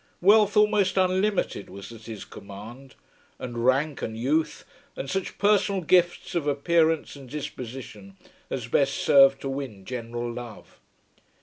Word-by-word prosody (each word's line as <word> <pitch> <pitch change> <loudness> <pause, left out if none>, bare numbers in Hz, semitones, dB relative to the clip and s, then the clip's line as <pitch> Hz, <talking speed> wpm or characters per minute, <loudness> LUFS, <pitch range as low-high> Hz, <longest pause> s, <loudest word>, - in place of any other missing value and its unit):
Wealth 210 +2 +5
almost 210 -3 +3
unlimited 190 - +1
was 100 +3 -10
at 115 -1 -12
his 110 -3 -7
command, 110 +7 -11 0.4
and 120 -2 -5
rank, 135 +4 +1
and 110 0 -4
youth, 150 +7 0 0.3
and 135 - -5
such 190 +7 -3
personal 200 -2 +2
gifts 175 +1 +2
of 165 -4 -1
appearance 160 +2 +1
and 135 -3 -12
disposition 125 -8 -8 0.3
as 125 -4 -3
best 135 +3 +2
serve 135 -1 +6
to - - -4
win 130 -8 -6
general 120 0 -4
love. 120 -2 -10
135 Hz, 135 wpm, -26 LUFS, 120-175 Hz, 0.4 s, serve